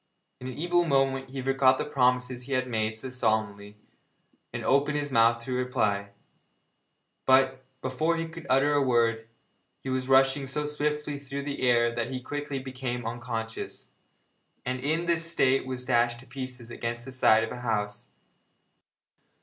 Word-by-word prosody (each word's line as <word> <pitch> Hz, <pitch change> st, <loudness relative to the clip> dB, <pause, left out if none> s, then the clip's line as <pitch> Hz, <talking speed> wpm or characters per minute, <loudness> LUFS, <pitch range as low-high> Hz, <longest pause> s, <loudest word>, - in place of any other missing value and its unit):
In 125 Hz, -, -7 dB
an 130 Hz, -, -6 dB
evil 175 Hz, +2 st, +2 dB
moment 135 Hz, -3 st, +1 dB
he 130 Hz, 0 st, -5 dB
forgot 135 Hz, 0 st, +4 dB
the -, -, -2 dB
promises 125 Hz, -2 st, +1 dB
he 135 Hz, +2 st, -5 dB
had 130 Hz, -1 st, +1 dB
made 110 Hz, -2 st, -1 dB
so 130 Hz, +3 st, -6 dB
solemnly, 110 Hz, -4 st, -1 dB, 0.7 s
and -, -, -5 dB
opened 145 Hz, +2 st, +3 dB
his 145 Hz, -1 st, -3 dB
mouth 115 Hz, -1 st, +4 dB
to 130 Hz, -, -4 dB
reply, 105 Hz, -6 st, 0 dB, 1.2 s
but, 130 Hz, 0 st, +4 dB, 0.2 s
before 155 Hz, +6 st, 0 dB
he 165 Hz, 0 st, -2 dB
could 165 Hz, 0 st, -10 dB
utter 135 Hz, +3 st, +4 dB
a 145 Hz, -, +3 dB
word, 115 Hz, -3 st, +2 dB, 0.6 s
he 130 Hz, -, -3 dB
was 130 Hz, 0 st, -1 dB
rushing 135 Hz, +1 st, +4 dB
so 150 Hz, +3 st, -2 dB
swiftly 150 Hz, 0 st, -2 dB
through 140 Hz, 0 st, -5 dB
the 140 Hz, 0 st, -4 dB
air 120 Hz, -1 st, +3 dB
that 120 Hz, 0 st, -2 dB
he 130 Hz, -1 st, -3 dB
quickly 145 Hz, +2 st, -4 dB
became 130 Hz, -2 st, -4 dB
unconscious, 115 Hz, -1 st, -5 dB, 0.8 s
and 125 Hz, 0 st, -2 dB
in 155 Hz, +6 st, 0 dB
this 170 Hz, -1 st, 0 dB
state 135 Hz, -5 st, +2 dB
was 130 Hz, -1 st, -4 dB
dashed 120 Hz, -1 st, +2 dB
to -, -, -15 dB
pieces 125 Hz, -2 st, -7 dB
against 120 Hz, 0 st, -4 dB
the 135 Hz, -, -7 dB
side 110 Hz, -3 st, +4 dB
of 115 Hz, -, -4 dB
a -, -, -6 dB
house. 105 Hz, -3 st, -2 dB
130 Hz, 165 wpm, -28 LUFS, 120-140 Hz, 1.2 s, forgot